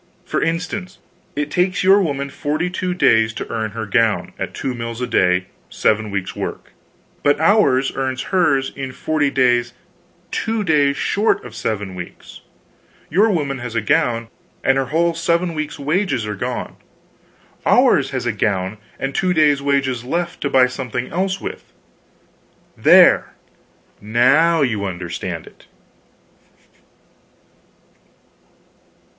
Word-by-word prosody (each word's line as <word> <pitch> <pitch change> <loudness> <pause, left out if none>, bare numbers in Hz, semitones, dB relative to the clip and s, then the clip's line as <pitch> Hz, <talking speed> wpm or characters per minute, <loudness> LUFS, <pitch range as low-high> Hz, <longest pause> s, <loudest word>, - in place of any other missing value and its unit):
For - - -1
instance, 180 +3 -3 0.4
it 145 0 -2
takes 180 +1 +1
your 195 +2 +6
woman 140 -5 -2
42 180 +6 -2
days 110 -10 +3
to - - -5
earn 110 -1 -2
her 115 0 -4
gown, 115 0 +1
at - - -4
2 130 - -3
mills 115 -1 -5
a 125 - -1
day 90 -4 +2 0.2
7 110 0 +1
weeks' 100 -2 -4
work; - - -6 0.5
but 145 0 +2
ours 160 -8 +3
earns 130 -1 -2
hers 140 -8 +2
in 135 -2 -5
forty 150 +1 0
days 120 -2 +2 0.6
two 225 -1 -1
days 145 -5 +2
short 210 - +1
of 120 - -9
7 105 -4 -3
weeks. 90 -1 -10 0.7
Your 205 +8 +4
woman 145 -8 -1
has 120 -1 -6
a - - +2
gown, 120 -4 +1 0.4
and 135 - +3
her 135 - 0
whole 170 +4 +1
seven 170 +1 0
weeks 155 -1 -4
wages 150 - 0
are 105 - -3
gone; 100 - -4 0.9
ours - - +4
has - - -3
a - - +1
gown, 100 0 -1 0.2
and 135 0 -3
two 180 +2 +1
days' 145 -3 +4
wages 135 -4 0
left, 170 +6 -3
to 140 - -1
buy 130 -2 +5
something 125 -1 -4
else 190 +1 -1
with. - - -8 1.0
There - - +5 0.7
now 140 +10 +3
you 110 -6 -1
understand 90 -2 -5
it!" - - -18
135 Hz, 135 wpm, -19 LUFS, 115-165 Hz, 1.0 s, your